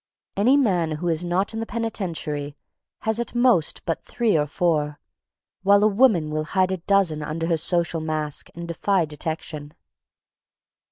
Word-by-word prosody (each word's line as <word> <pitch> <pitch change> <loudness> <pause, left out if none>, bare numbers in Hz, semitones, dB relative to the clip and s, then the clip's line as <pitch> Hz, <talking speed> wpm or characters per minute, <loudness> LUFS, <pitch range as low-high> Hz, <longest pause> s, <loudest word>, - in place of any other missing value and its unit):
Any 245 +8 +4
man 180 - +2
who 170 +3 -2
is 165 +1 0
not 180 +5 0
in 225 - -3
the 225 - -4
penitentiary 165 -10 -3 0.4
has 220 +1 0
at 235 - -4
most 240 -10 +2
but 165 - -2
three 230 -5 0
or 150 -1 +2
four, 150 -3 0 0.6
while 200 +1 +5
a - - +6
woman 200 -8 +3
will 155 0 -2
hide 185 0 +3
a 190 - -1
dozen 180 -4 +1
under 155 +2 -3
her 165 -1 +1
social 170 0 0
mask 155 -2 -3
and 170 0 -6
defy 175 +2 +1
detection. 150 -1 -5
170 Hz, 160 wpm, -23 LUFS, 155-200 Hz, 0.6 s, a